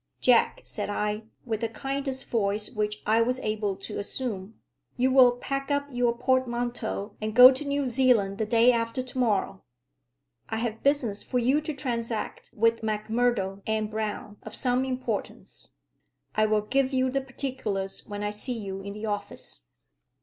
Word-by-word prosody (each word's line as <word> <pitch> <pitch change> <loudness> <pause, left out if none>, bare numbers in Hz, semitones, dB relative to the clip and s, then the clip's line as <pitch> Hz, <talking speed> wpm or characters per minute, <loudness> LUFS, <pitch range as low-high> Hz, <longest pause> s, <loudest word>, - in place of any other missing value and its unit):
"Jack," 245 -2 +4
said 205 - -4
I, 210 +1 -2 0.2
with 225 -2 -2
the 230 - 0
kindest 270 +2 -3
voice 210 -2 0
which 210 0 -2
I 220 +2 +4
was 250 +2 +1
able 210 -2 -1
to 195 +2 -6
assume, 205 -1 -4 0.4
"you 255 +1 +3
will 255 -2 +7
pack 275 +3 -3
up 285 0 +1
your 245 -1 +1
portmanteau 240 -4 -1
and 215 0 -3
go 250 +1 +11
to 270 +3 -3
New 285 -1 -1
Zealand 235 -6 +2
the 220 - 0
day 230 +2 +5
after 230 +1 -1
to 255 0 -9
morrow. 195 - +1 0.9
I 220 - -2
have 225 -1 -3
business 265 -8 +1
for 250 - -2
you 260 +5 +3
to 310 -1 -4
transact 235 -5 -3
with 230 +1 +3
Macmurdo 215 -2 0
and 215 -1 0
Brown 210 -1 -4
of 215 - -9
some 250 0 +1
importance. 260 -1 -5 0.6
I 215 0 +3
will 215 0 +2
give 265 +4 +1
you 260 0 +2
the 275 +1 0
particulars 250 -8 -4
when 205 0 -5
I 210 - -1
see 235 +4 -3
you 195 -3 -5
in 200 +1 -6
the 210 +2 -6
office." 200 - -5
230 Hz, 165 wpm, -27 LUFS, 210-255 Hz, 0.9 s, go